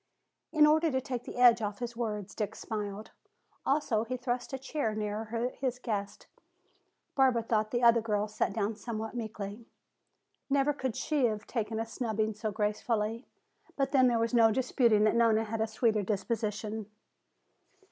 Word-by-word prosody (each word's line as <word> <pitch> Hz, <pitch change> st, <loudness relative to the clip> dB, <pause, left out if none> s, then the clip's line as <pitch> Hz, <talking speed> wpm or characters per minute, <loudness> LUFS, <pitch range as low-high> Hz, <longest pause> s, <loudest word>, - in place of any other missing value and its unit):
In 305 Hz, -2 st, +6 dB
order 315 Hz, +2 st, +4 dB
to 260 Hz, -3 st, 0 dB
take 250 Hz, -2 st, -5 dB
the -, -, -8 dB
edge 240 Hz, -2 st, +6 dB
off 205 Hz, -1 st, -3 dB
his 240 Hz, 0 st, -5 dB
words 210 Hz, -4 st, -3 dB
Dick 210 Hz, -2 st, -3 dB
smiled. 210 Hz, -1 st, -5 dB, 0.6 s
Also 270 Hz, -6 st, +2 dB
he 255 Hz, +2 st, -4 dB
thrust 245 Hz, +1 st, -3 dB
a 265 Hz, -, -2 dB
chair 265 Hz, -4 st, -2 dB
nearer 220 Hz, +3 st, -2 dB
his 255 Hz, -2 st, -1 dB
guest. 205 Hz, -5 st, -4 dB, 0.9 s
Barbara 260 Hz, -4 st, +3 dB
thought 215 Hz, -2 st, 0 dB
the 240 Hz, +2 st, -1 dB
other 235 Hz, -1 st, +6 dB
girl 210 Hz, -1 st, 0 dB
sat 210 Hz, 0 st, -1 dB
down 215 Hz, +1 st, -1 dB
somewhat 220 Hz, 0 st, -5 dB
meekly. 220 Hz, -1 st, -6 dB, 0.8 s
Never 280 Hz, +1 st, +3 dB
could 260 Hz, -4 st, -3 dB
she 295 Hz, -5 st, +1 dB
have 215 Hz, -3 st, -1 dB
taken 220 Hz, -2 st, -2 dB
a 225 Hz, -, -1 dB
snubbing 220 Hz, -2 st, -2 dB
so 215 Hz, +1 st, -3 dB
gracefully. 215 Hz, +2 st, -1 dB, 0.5 s
But 275 Hz, -1 st, 0 dB
then 260 Hz, -2 st, +5 dB
there 240 Hz, -1 st, +2 dB
was 230 Hz, +1 st, 0 dB
no 225 Hz, -2 st, +6 dB
disputing 235 Hz, -3 st, +3 dB
that 215 Hz, -, +4 dB
Nona 230 Hz, -1 st, +4 dB
had 225 Hz, +1 st, -4 dB
the 220 Hz, -, +1 dB
sweeter 220 Hz, -1 st, +1 dB
disposition. 215 Hz, +1 st, -2 dB
225 Hz, 165 wpm, -30 LUFS, 215-245 Hz, 0.9 s, In